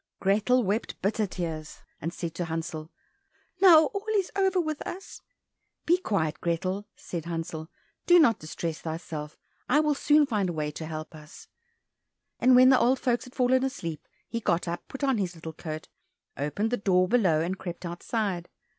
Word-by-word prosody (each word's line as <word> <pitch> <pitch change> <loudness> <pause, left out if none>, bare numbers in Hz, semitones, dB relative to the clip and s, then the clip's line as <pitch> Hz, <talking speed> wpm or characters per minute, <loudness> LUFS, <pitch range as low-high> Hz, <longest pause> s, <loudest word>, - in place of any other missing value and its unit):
Grethel 215 +6 +3
wept 205 +3 -2
bitter 210 +1 +1
tears, 160 -4 -5 0.2
and 165 - -2
said 170 -2 -5
to 175 0 -3
Hansel, 160 -1 -4 0.7
"Now 330 -5 +8
all 400 +7 -5
is 390 -3 +1
over 385 -1 +2
with 310 -3 -2
us." 380 +2 -7 0.6
"Be 350 +2 +4
quiet, 165 - -1
Grethel," 185 +4 -1
said 170 -3 -6
Hansel, 165 -1 -4 0.4
"do 350 - +8
not 290 -9 +5
distress 160 +1 -4
thyself, 160 -2 -6 0.3
I 275 +4 +5
will 300 -1 +3
soon 295 +1 +4
find 210 -8 0
a - - -3
way 150 -1 -2
to 155 +1 -7
help 155 0 -6
us." 150 -1 -13 0.9
And 255 0 +6
when 255 +1 +8
the 260 - +6
old 255 +2 +3
folks 245 0 0
had 250 - -14
fallen 255 0 +3
asleep, 170 - -4 0.2
he 230 - -3
got 175 -5 0
up, 170 +1 -4
put 270 - -7
on 270 -5 +2
his 180 -3 -2
little 160 0 -8
coat, 155 0 -6 0.5
opened 150 +11 -1
the 245 - +1
door 185 -3 +3
below, 185 -9 +3
and 185 +3 -2
crept 175 0 -6
outside. 175 +1 -3
190 Hz, 175 wpm, -27 LUFS, 165-255 Hz, 0.9 s, Now